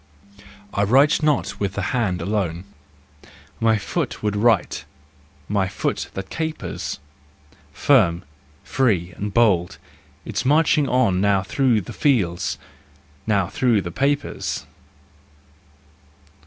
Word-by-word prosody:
I 100 - 0
write 135 +10 +4
not 150 -2 0
with 100 -2 -1
the 100 - -3
hand 95 -9 0
alone, 90 -3 -2 1.0
My 110 -1 +3
foot 105 - -3
would 105 -1 0
write, 115 +1 +2 0.6
my 100 -2 0
foot 95 -1 -3
that 95 0 -6
capers, 160 -1 -4 0.7
Firm, 95 -11 +3 0.4
free 95 -10 0
and 105 +1 -4
bold, 100 -6 +2 0.5
it's 110 +1 -3
marching 150 0 +3
on 110 -8 +2
Now 100 -1 +2
through 120 +1 +1
the 85 - -9
fields, 100 - 0 0.7
now 100 -4 +2
through 110 +3 +1
the 85 - -5
papers. 140 - -1
105 Hz, 110 wpm, -22 LUFS, 95-130 Hz, 1.0 s, write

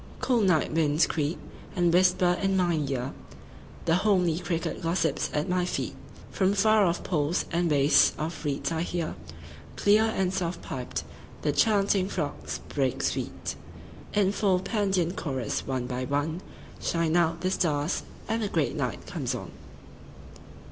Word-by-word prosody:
9Cool 235 -5 +2
night 165 -5 +2
winds 155 0 +3
creep, 155 +1 -1 0.4
and 175 -1 +2
whisper 180 0 +4
in 195 -1 +2
mine 170 -5 +1
ear.10The 125 - -5
homely 180 -5 +2
cricket 170 -2 -3
gossips 165 -3 0
at 150 +1 -1
my 180 0 +1
feet.11From 190 +2 -2
far 215 0 +5
off 170 0 -1
pools 155 -1 0
and 170 0 +1
wastes 145 0 +5
of 160 +2 -4
reeds 145 +1 -1
I 160 -1 -1
hear,12Clear 80 - -1
and 190 -1 0
soft 175 -2 -2
piped, 125 -9 -4 0.4
the 150 - +2
chanting 200 +1 +2
frogs 75 - -4
break 135 -3 -1
sweet13In 200 -1 -3
full 195 -3 +2
Pandean 190 -4 0
chorus. 130 -7 -3
One 130 -2 -1
by 125 0 -3
one14Shine 160 +2 -2
out 165 -1 +2
the 185 - 0
stars, 155 -3 0 0.3
and 225 0 -1
the 210 - 0
great - - 0
night - - -3
comes - - -3
on. - - -7
170 Hz, 135 wpm, -27 LUFS, 145-185 Hz, 0.4 s, far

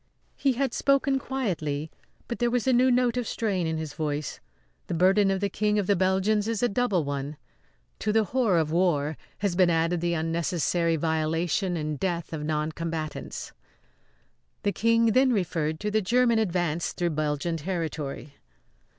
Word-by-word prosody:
He 275 -2 +1
had 265 0 -1
spoken 275 -1 +2
quietly, 160 - -3 0.4
but 235 - -4
there 240 -1 +2
was 245 -1 0
a 260 - +3
new 255 +2 +4
note 250 -1 +2
of 245 -3 -1
strain 195 -7 -1
in 160 0 -1
his 155 -2 -5
voice. 150 -1 -3 0.5
The 175 - -2
burden 195 +4 +4
of 195 0 0
the 200 - +2
King 210 +2 0
of 205 - +1
the 200 - +3
Belgians 190 +3 +1
is 230 0 -1
a - - +5
double 205 -6 +1
one. 140 +1 -4 0.6
To 215 - 0
the 220 +1 +3
horror 225 -4 +1
of 155 -2 +1
war 160 -4 +1 0.2
has 200 -4 -1
been 180 -1 +4
added 165 +1 +1
the 170 0 0
unnecessary 165 +1 0
violation 165 +3 0
and 150 -2 -3
death 170 -3 -2
of 150 -2 -4
noncombatants. 155 0 -3 1.1
The 205 - +2
King 230 +1 +3
then 260 +3 +4
referred 160 -6 -1
to 210 0 -1
the 215 +1 +2
German 235 +2 +3
advance 175 -5 -1
through 175 -1 -1
Belgian 155 +2 -1
territory. 155 -4 -4
180 Hz, 165 wpm, -27 LUFS, 160-215 Hz, 1.1 s, a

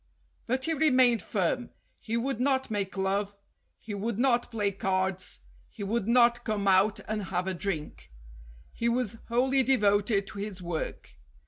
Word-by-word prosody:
But 260 +2 0
he 325 - +1
remained 255 - +4
firm. 200 +6 -1 0.3
He 230 +1 -2
would 245 0 -2
not 265 -1 +1
make 200 -2 -2
love; 200 +1 -1 0.4
he 210 - -8
would 205 +2 -3
not 240 -1 +2
play 210 -4 0
cards; 190 -1 -2 0.3
he 205 - -8
would 215 +1 -1
not 240 0 +4
come 210 -3 -1
out 195 +3 +4
and 215 -2 -2
have 180 -1 -2
a 190 - -1
drink; 170 - -5 0.6
he 235 - 0
was 235 -2 -1
wholly 260 +3 +3
devoted 205 -5 +2
to 200 - -9
his 200 -2 -5
work. 175 -3 -5
215 Hz, 155 wpm, -28 LUFS, 195-240 Hz, 0.6 s, remained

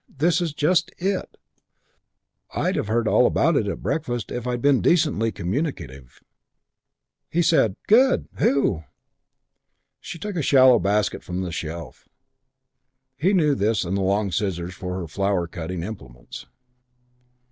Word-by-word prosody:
This 170 +5 +1
is 170 -2 -1
just 165 +4 +1
it. 190 +1 -3 1.2
I'd - - 0
have - - -2
heard 115 +1 0
all - - +4
about - - +2
it - - +1
at - - -5
breakfast 120 -8 -3
if 125 0 -4
I'd 125 -1 -1
been 140 0 +3
decently 150 -10 +2
communicative." 85 - -5 1.1
He 175 +1 +1
said, 115 - +3
"Good. 255 +5 +4
Who?" 135 - +2 1.2
She - - -8
took 205 +3 -6
a - - 0
shallow 130 -3 +5
basket 100 +1 0
from 90 +1 -4
the 90 -2 -4
shelf. 80 0 -7 1.1
He 160 +9 +1
knew 160 -7 +3
this 105 -6 0
and 90 +3 -2
the 100 - 0
long 100 +1 0
scissors 90 -3 -2
for 90 0 -5
her 85 - -5
flower 95 +2 -1
cutting 85 0 -6
implements. 65 - -9
110 Hz, 140 wpm, -23 LUFS, 90-150 Hz, 1.2 s, shallow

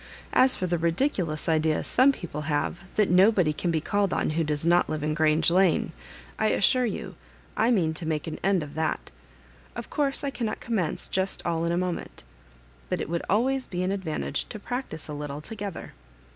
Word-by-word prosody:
As 260 0 +6
for 185 - -2
the 175 -1 0
ridiculous 170 - 0
idea 160 -1 +2
some 265 +2 +4
people 170 - -6
have 150 +4 -1
that 210 -4 +2
no 190 +5 +6
body 180 -8 +2
can 175 - -2
be 165 -1 +1
called 200 +4 0
on - - 0
who 165 +1 0
does 150 0 +3
not 175 +1 +4
live 155 -1 -3
in 150 0 0
Grange 160 +1 +3
Lane, 180 -2 +3 0.5
I 220 - +3
assure 250 +4 +3
you - - -5 0.4
I 225 - +2
mean 175 -9 +2
to 160 0 -5
make 155 -2 -1
an 160 - -5
end 190 -3 +2
of 145 - -9
that 160 0 -2 0.6
Of - - -7
course 285 -2 0
I 280 - -1
cannot 230 -5 -3
commence 210 -9 -2
just 190 0 -1
all 165 -1 0
in 170 - 0
a 170 - 0
moment 180 -1 -4 0.7
But - - -1
it - - -4
would 170 0 -1
always 260 +5 +1
be 180 0 -3
an 185 - 0
advantage 165 -7 -2
to - - -6
practise 245 - -5
a 150 - -6
little 145 -1 -5
together. 205 +2 -7
175 Hz, 200 wpm, -26 LUFS, 160-210 Hz, 0.7 s, As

